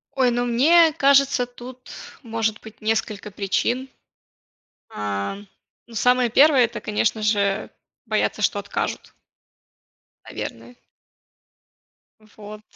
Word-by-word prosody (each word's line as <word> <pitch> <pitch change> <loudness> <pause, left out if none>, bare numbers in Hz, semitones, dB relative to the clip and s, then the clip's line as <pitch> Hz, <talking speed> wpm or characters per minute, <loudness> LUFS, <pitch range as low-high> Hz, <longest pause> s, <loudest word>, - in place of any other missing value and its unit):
Ой, 260 -2 +3
ну, 245 +1 0
мне 315 +8 +5
кажется, 275 -3 +3
тут 245 +1 -12 0.3
может 225 -3 -2
быть 220 0 -14
несколько 215 -1 -2
причин, 235 +7 -1 1.0
а, 100 - -4 0.5
ну, 235 - -15
самое 245 +1 +2
первое- 275 +1 +5
это, 230 - -4
конечно 215 +1 -1
же, 205 -1 0 0.4
боятся, - - -1
что - - +1
откажут. - - -4 1.1
Наверное. 245 - -8 1.4
Вот. 215 0 -12
230 Hz, 100 wpm, -22 LUFS, 215-255 Hz, 1.4 s, мне